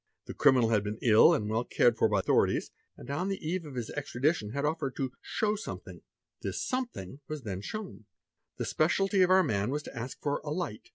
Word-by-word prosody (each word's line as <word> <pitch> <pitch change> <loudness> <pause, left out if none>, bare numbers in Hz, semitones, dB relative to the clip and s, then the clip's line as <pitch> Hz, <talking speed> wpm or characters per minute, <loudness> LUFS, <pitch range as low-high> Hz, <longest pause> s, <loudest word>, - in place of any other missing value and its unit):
The - - -7
criminal 125 -4 +4
had 105 -3 +2
been 105 +1 -4
ill, 110 -2 +7
and 105 - +1
well 110 +2 0
cared 120 -1 +3
for 115 - +3
by 105 -2 +2
the - - -1
ithorities, - - +2 0.3
and - - -11
on 180 +7 -1
the 195 - -1
eve 175 0 -2
of 140 - -9
his 120 -3 -4
extradition 140 -4 -1
had 140 +6 -2
offered 150 -3 -1
to 135 -2 -2
'show 215 -1 0
some 215 - -5
fe - - -11
hing." - - -13 0.4
This - - -3
"something" 235 - -4
was 155 -3 -5
then 95 -4 -4
shown. 205 - -7 0.5
The - - -2
speciality 195 +5 +2
of 180 - +5
our 185 0 +6
man 105 - 0
as 150 +1 -2
to - - -10
ask 120 +2 -6
for 145 - -1
"a 150 - -5
light." 150 -9 -4
140 Hz, 230 wpm, -30 LUFS, 110-175 Hz, 0.5 s, ill